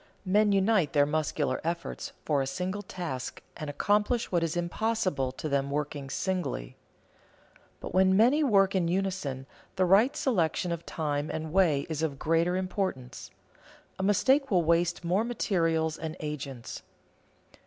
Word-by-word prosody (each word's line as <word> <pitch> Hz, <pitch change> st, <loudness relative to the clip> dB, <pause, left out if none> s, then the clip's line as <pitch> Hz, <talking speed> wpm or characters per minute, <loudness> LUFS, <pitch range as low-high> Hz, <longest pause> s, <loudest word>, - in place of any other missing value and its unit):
Men 205 Hz, +2 st, +3 dB
unite 195 Hz, -5 st, +2 dB
their 145 Hz, -1 st, +5 dB
muscular 150 Hz, -2 st, -1 dB
efforts 170 Hz, +1 st, -4 dB
for 145 Hz, -3 st, +2 dB
a 135 Hz, -, -2 dB
single 185 Hz, +7 st, -3 dB
task, 170 Hz, -10 st, -6 dB
and 155 Hz, -, -6 dB
accomplish 210 Hz, -, +1 dB
what 175 Hz, -2 st, +2 dB
is 165 Hz, 0 st, -1 dB
impossible 175 Hz, -, -1 dB
to 155 Hz, -, -5 dB
them 140 Hz, -1 st, 0 dB
working 145 Hz, -1 st, -3 dB
singly. 145 Hz, -, -3 dB, 1.0 s
But -, -, -7 dB
when 190 Hz, 0 st, +4 dB
many 255 Hz, +8 st, +4 dB
work 195 Hz, -7 st, +4 dB
in 185 Hz, -3 st, +1 dB
unison, 180 Hz, -8 st, -2 dB, 0.3 s
the 190 Hz, -1 st, +2 dB
right 205 Hz, +9 st, +4 dB
selection 180 Hz, -, 0 dB
of 170 Hz, -1 st, -5 dB
time 150 Hz, -1 st, -2 dB
and 160 Hz, 0 st, -4 dB
way 165 Hz, -7 st, +3 dB
is 160 Hz, -1 st, -3 dB
of 150 Hz, -4 st, -1 dB
greater 165 Hz, +4 st, +1 dB
importance; 185 Hz, -, -3 dB, 0.7 s
a -, -, -1 dB
mistake 265 Hz, +8 st, +3 dB
will 180 Hz, -5 st, +3 dB
waste 170 Hz, +2 st, +1 dB
more 185 Hz, +5 st, +2 dB
materials 165 Hz, -9 st, 0 dB
and 160 Hz, -1 st, -5 dB
agents. 140 Hz, -5 st, -6 dB
170 Hz, 145 wpm, -29 LUFS, 150-195 Hz, 1.0 s, their